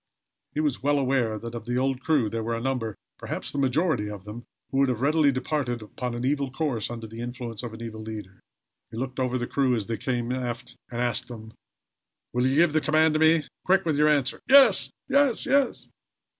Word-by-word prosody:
He - - 0
was 145 -4 -1
well 145 +2 +2
aware 130 -5 +1
that 115 +2 -7
of 120 - -6
the 120 0 -1
old 130 0 0
crew 145 -6 +2
there 115 +2 -3
were 115 +1 -2
a - - -3
number 120 -4 -2 0.2
perhaps - - -5
the 140 - -3
majority 135 - +1
of 105 -2 -8
them 105 +4 -9 0.3
who 135 - +1
would 135 -1 +4
have 125 -2 -2
readily 150 0 +4
departed 130 -3 -2
upon 120 +3 -5
an 120 +1 -3
evil 140 0 0
course 135 -6 -2
under 115 -1 -6
the 110 +1 -9
influence 120 -2 -5
of 120 -2 -6
an 110 +1 -8
evil 110 -1 -7
leader. 105 -3 -8 0.5
He - - -9
looked 130 +1 -4
over 130 -1 0
the 120 - -2
crew 130 -1 +1
as 110 -3 -2
they 115 +1 -3
came 120 0 -2
aft, 125 -1 -4
and 120 0 -3
asked 125 +1 0
them: 110 -2 -10 0.8
"Will 125 +1 +2
you 135 - +1
give 165 0 +4
the 155 - +3
command 155 +1 +3
to 155 - +1
me? 160 0 +5 0.2
Quick 190 0 +3
with 160 -3 +1
your 150 +1 +4
answer!" 140 -3 +1
"Yes! 275 0 +7 0.2
Yes!" 280 0 +2
125 Hz, 215 wpm, -26 LUFS, 115-145 Hz, 0.8 s, Yes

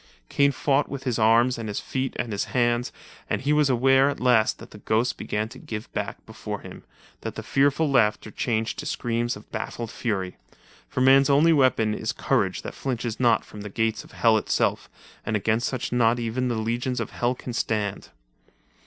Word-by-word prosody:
Kane 140 0 +3
fought 140 +1 +1
with 140 -2 -6
his 125 -4 -1
arms 115 +3 +4
and 110 -2 -4
his 100 - -2
feet 130 -1 -3
and 120 - -3
his 100 - -1
hands, 120 -1 0 0.4
and - - 0
he 145 +2 +1
was 150 -2 +3
aware 135 +2 +4
at 140 - -4
last 120 -4 +3
that - - -13
the 105 - -12
ghost 110 +4 0
began 105 +1 -3
to - - -12
give 110 0 -7
back - - -4
before - - -6
him, - - -11 0.4
and - - -5
the - - -6
fearful 145 +3 +2
slaughter 110 -4 +2
changed 110 -1 -2
to - - -5
screams 120 0 -1
of 105 - -14
baffled 115 +1 -5
fury. 95 -6 -3 0.5
For 130 - -2
man's 135 +2 +6
only 150 +4 +5
weapon 130 -7 +3
is - - -3
courage - - 0
that - - -6
flinches 120 -4 -3
not 120 -3 +3
from 105 - -10
the 105 - -6
gates 110 +1 -1
of - - -17
Hell 110 -2 +4
itself, - - 0 0.3
and 110 - -2
against 110 +3 +1
such 130 -2 -3
not 120 -1 +3
even 120 +2 -2
the 120 - -1
legions 120 +3 -2
of - - -4
Hell 120 +1 0
can 125 - -7
stand. 105 -3 -2
120 Hz, 195 wpm, -25 LUFS, 110-130 Hz, 0.5 s, man's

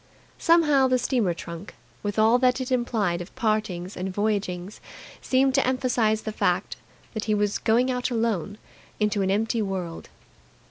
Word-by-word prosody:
Somehow 300 -6 +4
the 255 0 +3
steamer 240 -8 0
trunk, 170 +3 -8 0.3
with 205 +1 -3
all 220 +3 +5
that 250 0 +3
it 260 0 -4
implied 220 -8 0
of 175 - -10
partings 215 -6 -1
and 185 +1 -3
voyagings, 200 -2 -2 0.4
seemed 265 +1 +2
to 275 -1 +2
emphasize 245 -4 +1
the 215 - -3
fact - - 0 0.4
that 220 -2 -3
he 215 - +1
was 205 0 0
going 240 +3 +2
out 250 0 -1
alone 225 -5 -1 0.4
into 210 -1 +1
an 190 - +1
empty 225 +3 +1
world. 185 -5 -4
220 Hz, 155 wpm, -25 LUFS, 195-250 Hz, 0.4 s, all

